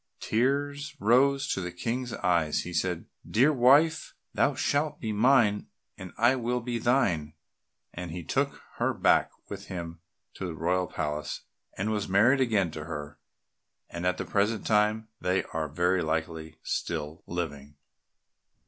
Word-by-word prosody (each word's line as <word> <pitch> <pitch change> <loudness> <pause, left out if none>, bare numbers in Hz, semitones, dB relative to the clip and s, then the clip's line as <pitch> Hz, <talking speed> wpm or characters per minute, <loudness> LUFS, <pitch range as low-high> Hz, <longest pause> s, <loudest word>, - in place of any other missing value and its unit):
Tears 140 +5 0
rose 135 +6 +3
to 95 - -1
the 90 -1 -4
King's 120 +7 -3
eyes 85 -7 +1
and - - +1
he 90 - -7
said, 90 0 -1 0.2
"Dear 135 +8 +4
wife, 145 +6 +4 0.2
thou 140 -1 +2
shalt 145 +2 0
be 110 - -3
mine 110 -2 +3 0.3
and 95 -2 -9
I 120 +4 +4
will 125 0 -1
be 120 0 -3
thine," 95 - +1 0.6
and 90 0 -6
he 85 +1 -6
took - - -1
her - - 0
back - - +3 0.2
with 100 0 -7
him 85 -3 -6 0.3
to 95 - -5
the 85 - -5
royal 90 +3 0
palace 75 0 -3 0.4
and 105 +3 -1
was 105 -3 -2
married 115 +8 +4
again 105 -9 +2
to 75 0 -7
her, 75 -2 -7 0.7
and 85 +1 -2
at 90 0 +1
the - - -3
present 105 +2 0
time 110 +1 +2
they 95 +1 +1
are 80 -1 -1
very 90 +5 +1
likely 80 0 -3
still 80 -1 -3
living. 75 -4 -5
95 Hz, 155 wpm, -28 LUFS, 85-120 Hz, 0.7 s, Dear